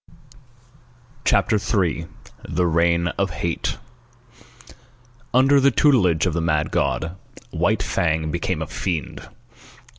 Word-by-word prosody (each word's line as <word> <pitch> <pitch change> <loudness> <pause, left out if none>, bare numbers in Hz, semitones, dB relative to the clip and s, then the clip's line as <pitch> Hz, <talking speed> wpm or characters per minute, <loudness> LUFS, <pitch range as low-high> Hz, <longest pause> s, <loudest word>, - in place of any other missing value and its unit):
CHAPTER 110 - +3
III 90 -6 -1 0.4
THE 90 - 0
REIGN 85 +1 +2
OF - - +1
HATE - - -3 1.5
Under 135 +3 +5
the 140 +1 +5
tutelage 105 - +3
of 90 - 0
the 85 - -1
mad 75 -2 0
god, 80 +3 -1 0.4
White - - 0
Fang 80 -2 -1
became 85 +1 -2
a - - -5
fiend. 85 -5 -4
85 Hz, 110 wpm, -22 LUFS, 80-105 Hz, 1.5 s, Under